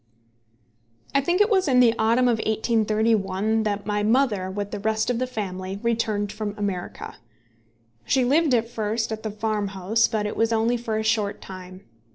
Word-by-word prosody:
I 275 - +3
think 350 +7 +1
it 415 - +4
was 380 -4 +3
in 255 -2 +4
the 240 -2 +6
autumn 230 +3 +3
of 235 -2 +2
1831 220 -1 +1
that 205 -2 -2
my 210 0 -1
mother, 215 -4 +1
with 205 +1 -4
the 205 - -4
rest 220 +3 0
of 235 - -1
the 255 - -1
family, 195 -4 -5
returned 220 -3 0
from 210 -1 -5
America. 195 -4 -4 0.9
She 260 -2 +2
lived 290 +1 +3
at 230 -1 +1
first 220 -1 -2
at 220 0 -4
the 220 - -3
farmhouse, 210 0 0
but 215 -3 -2
it 210 - -3
was 225 0 +1
only 225 +2 +2
for 230 -2 -3
a 220 - -1
short 215 -2 0
time. 185 0 -10
220 Hz, 180 wpm, -24 LUFS, 205-235 Hz, 0.9 s, the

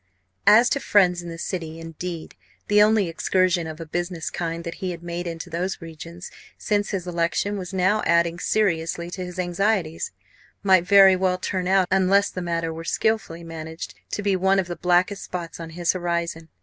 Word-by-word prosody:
As 230 +3 +8
to 280 - +2
friends 180 -7 +3
in 175 - -8
the 165 - -7
City, 165 -2 -4
indeed, 165 +1 -6 0.4
the 205 0 +6
only 210 -2 +4
excursion 180 0 +1
of 160 0 -7
a 165 - -6
business 175 +1 -3
kind 170 -1 -3
that 170 -1 -5
he 185 - -1
had 170 -1 -6
made 175 +1 -4
into 165 0 -5
those 175 +3 -3
regions 165 +1 -9 0.3
since 205 -1 0
his 190 -3 -3
election 175 +4 0
was 185 -2 -5
now 190 +3 +2
adding 170 0 +2
seriously 170 -4 0
to 185 0 -5
his 180 0 -8
anxieties 180 -2 0 0.5
might 185 -3 +4
very 195 -2 +8
well 185 0 +1
turn 185 0 -2
out, 190 -1 +3
unless 195 +1 +3
the 185 - -5
matter 165 -1 -2
were 165 +1 -7
skilfully 170 -3 -1
managed, 160 -8 -7 0.2
to 205 - -3
be 200 -1 +2
one 190 +1 +3
of 190 - +2
the 175 0 -5
blackest 180 +3 +2
spots 175 -2 -6
on 165 -1 -6
his 170 +1 0
horizon. 170 -2 -3
175 Hz, 190 wpm, -24 LUFS, 165-190 Hz, 0.5 s, As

